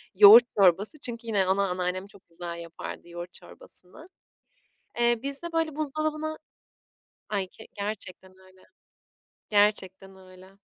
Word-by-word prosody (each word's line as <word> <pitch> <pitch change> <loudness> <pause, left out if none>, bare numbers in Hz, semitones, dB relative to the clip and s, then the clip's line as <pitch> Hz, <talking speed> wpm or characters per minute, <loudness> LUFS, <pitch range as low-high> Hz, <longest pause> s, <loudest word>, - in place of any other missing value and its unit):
yoğurt 210 +5 +10
çorbası 200 - +3
çünkü 235 -1 -3
yine 205 -4 +1
ana 195 +1 +1
anneannem 180 +1 -3
çok 200 -2 -19
güzel 170 0 -7
yapardı 170 0 -9
yoğurt 175 +1 -8
çorbasını. 315 - -10 0.9
Eee, 235 -1 +3
bizde, 280 +5 -4
böyle, 325 -2 0
buzdolabına 310 +1 -3 0.9
Ay, 195 -3 -2
k 220 - -15
gerçekten 200 -2 -4
öyle, 185 0 -21 0.9
gerçekten 195 -2 +1
öyle. 185 0 -16
200 Hz, 120 wpm, -27 LUFS, 185-240 Hz, 0.9 s, yoğurt